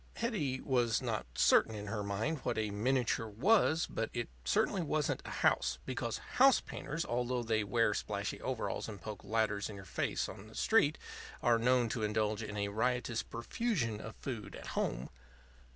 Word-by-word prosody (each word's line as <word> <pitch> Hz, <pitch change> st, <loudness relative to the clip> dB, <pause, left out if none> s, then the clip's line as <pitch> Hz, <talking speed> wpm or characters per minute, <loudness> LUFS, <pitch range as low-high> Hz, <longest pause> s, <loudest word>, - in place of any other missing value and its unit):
Hetty 160 Hz, -, -1 dB
was 120 Hz, -4 st, +2 dB
not -, -, -2 dB
certain 110 Hz, +10 st, +4 dB
in 105 Hz, -1 st, -5 dB
her 105 Hz, +1 st, -3 dB
mind 105 Hz, +10 st, -1 dB
what -, -, -2 dB
a 110 Hz, -2 st, 0 dB
miniature 115 Hz, +1 st, +1 dB
was; 160 Hz, -, +3 dB
but 115 Hz, -, -2 dB
it 120 Hz, -1 st, -3 dB
certainly 205 Hz, -2 st, +2 dB
wasn't 155 Hz, -2 st, 0 dB
a -, -, -6 dB, 0.2 s
house; 65 Hz, +1 st, +3 dB
because 125 Hz, -3 st, -2 dB, 0.2 s
house 265 Hz, 0 st, +7 dB
painters, 150 Hz, +4 st, -4 dB
although 125 Hz, +1 st, -1 dB
they 110 Hz, -2 st, +1 dB
wear 115 Hz, +1 st, +2 dB
splashy 100 Hz, -1 st, -3 dB
overalls 125 Hz, -3 st, -2 dB
and 105 Hz, -2 st, -7 dB
poke 105 Hz, 0 st, -7 dB
ladders 105 Hz, -1 st, 0 dB
in 105 Hz, -, -7 dB
your 95 Hz, -1 st, -9 dB
face -, -, -1 dB
on 95 Hz, -, -9 dB
the 110 Hz, -, -14 dB
street, 160 Hz, -9 st, +3 dB, 0.5 s
are 120 Hz, -1 st, +4 dB
known 125 Hz, 0 st, +3 dB
to 115 Hz, -, -2 dB
indulge 105 Hz, 0 st, 0 dB
in 105 Hz, -1 st, -5 dB
a 100 Hz, 0 st, 0 dB
riotous 120 Hz, +1 st, 0 dB
profusion 115 Hz, -, -2 dB
of 110 Hz, -, -8 dB
food 115 Hz, -7 st, -6 dB
at -, -, -9 dB
home. -, -, -1 dB
115 Hz, 175 wpm, -34 LUFS, 105-130 Hz, 0.5 s, house